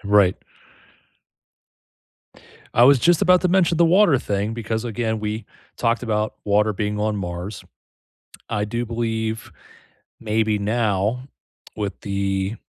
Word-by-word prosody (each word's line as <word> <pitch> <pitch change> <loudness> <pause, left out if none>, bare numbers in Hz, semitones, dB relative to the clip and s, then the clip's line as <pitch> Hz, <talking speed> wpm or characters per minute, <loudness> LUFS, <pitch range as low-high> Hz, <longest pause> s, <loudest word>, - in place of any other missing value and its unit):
Right. 100 -2 +4 2.4
I 120 - +6
was 140 0 +6
just 175 +7 +3
about 180 -1 +5
to 180 - +2
mention 175 -2 +2
the 170 - +6
water 175 -4 +5
thing 105 -1 -2
because, 110 0 -3
again, 110 -1 -2
we 110 +1 -3 0.3
talked 115 0 0
about 110 -2 -1
water 105 +1 +2
being 105 +1 -3
on 105 0 0
Mars. 90 +1 -6 0.9
I 105 -1 -1
do 120 +3 -3
believe, 110 -1 -3 0.7
maybe 110 -1 0
now, 110 +3 0 0.5
with 100 -3 -4
the 100 +1 -2
110 Hz, 125 wpm, -22 LUFS, 105-120 Hz, 2.4 s, I